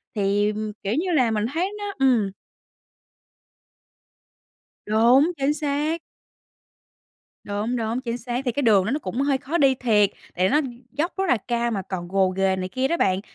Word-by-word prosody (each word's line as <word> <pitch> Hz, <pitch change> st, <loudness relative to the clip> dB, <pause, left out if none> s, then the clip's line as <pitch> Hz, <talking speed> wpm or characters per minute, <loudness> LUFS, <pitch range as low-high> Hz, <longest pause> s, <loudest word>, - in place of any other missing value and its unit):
thì, 205 Hz, +1 st, +1 dB, 0.3 s
kiểu, 200 Hz, -, -1 dB
như 345 Hz, +8 st, 0 dB
là 255 Hz, -8 st, +3 dB
mình 210 Hz, 0 st, 0 dB
thấy 365 Hz, +5 st, 0 dB
nó 410 Hz, -1 st, -4 dB
ừm. 235 Hz, -7 st, +3 dB, 2.5 s
Đúng, 240 Hz, +9 st, +4 dB
chính 280 Hz, +1 st, +1 dB
xác. 300 Hz, +2 st, -1 dB, 1.4 s
Đúng, 210 Hz, +4 st, -2 dB
đúng, 230 Hz, +1 st, -2 dB
chính 240 Hz, -2 st, -4 dB
xác, 245 Hz, +2 st, -3 dB
thì 245 Hz, -, 0 dB
cái 285 Hz, -, -1 dB
đường 210 Hz, -6 st, +4 dB
đó -, -, -1 dB
nó 285 Hz, -, 0 dB
cũng 240 Hz, -1 st, -4 dB
hơi 275 Hz, -1 st, +2 dB
khó 290 Hz, +5 st, -2 dB
đi 270 Hz, -3 st, +4 dB
thiệt, 215 Hz, -5 st, +3 dB, 0.3 s
tại 185 Hz, +1 st, +3 dB
nó 300 Hz, +7 st, +3 dB, 0.3 s
dốc 330 Hz, +4 st, -1 dB
rất 385 Hz, -, 0 dB
là 250 Hz, -, +4 dB
cao 235 Hz, +2 st, -1 dB
mà 200 Hz, -4 st, -2 dB
còn 180 Hz, -2 st, -6 dB
gồ 190 Hz, 0 st, +2 dB
ghề 190 Hz, 0 st, +1 dB
này 185 Hz, 0 st, -3 dB
kia 260 Hz, +7 st, -1 dB
đó 340 Hz, -, +1 dB
bạn, 190 Hz, -, +1 dB
240 Hz, 175 wpm, -23 LUFS, 205-280 Hz, 2.5 s, Đúng